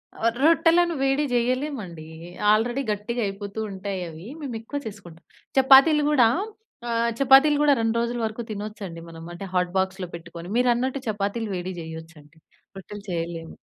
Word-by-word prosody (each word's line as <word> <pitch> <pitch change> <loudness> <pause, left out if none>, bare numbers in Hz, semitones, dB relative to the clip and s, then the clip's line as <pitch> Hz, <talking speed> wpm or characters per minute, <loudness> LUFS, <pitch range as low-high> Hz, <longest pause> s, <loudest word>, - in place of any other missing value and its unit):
ఆ! - - -4 0.2
రొట్టెలను 335 +1 +4
వేడి 270 +2 +2
చేయలేమండి. 240 - -2 0.5
ఆల్రెడీ 240 +5 +2
గట్టిగా 220 +4 -3
అయిపోతూ 200 +1 -5
ఉంటాయవి. 185 -2 -6
మేమెక్కువ 250 0 -5
చేసుకుంటాం. 175 -5 -11 0.4
చపాతీలు 275 +3 +7
కూడా 250 -6 +5 0.6
ఆహ్, 235 0 +1
చపాతీలు 275 +2 +6
కూడా 295 -1 +5
2 225 0 0
రోజుల 235 +1 -1
వరకు 220 +2 -4
తినొచ్చండి. 205 -4 -6
మనం 165 0 -10
అంటే, 175 +3 -7
హాట్ 180 -1 +1
బాక్స్‌లో 190 0 -1
పెట్టుకొని. 170 0 -9
మీరన్నట్టు 250 +2 +1
చపాతీలు 210 +2 -2
వేడి 180 +1 -4
చేయొచ్చండి. 160 -1 -11 0.4
రొట్టెలు 205 +2 -9
చేయలేము. 165 -1 -4
215 Hz, 130 wpm, -24 LUFS, 180-255 Hz, 0.6 s, చపాతీలు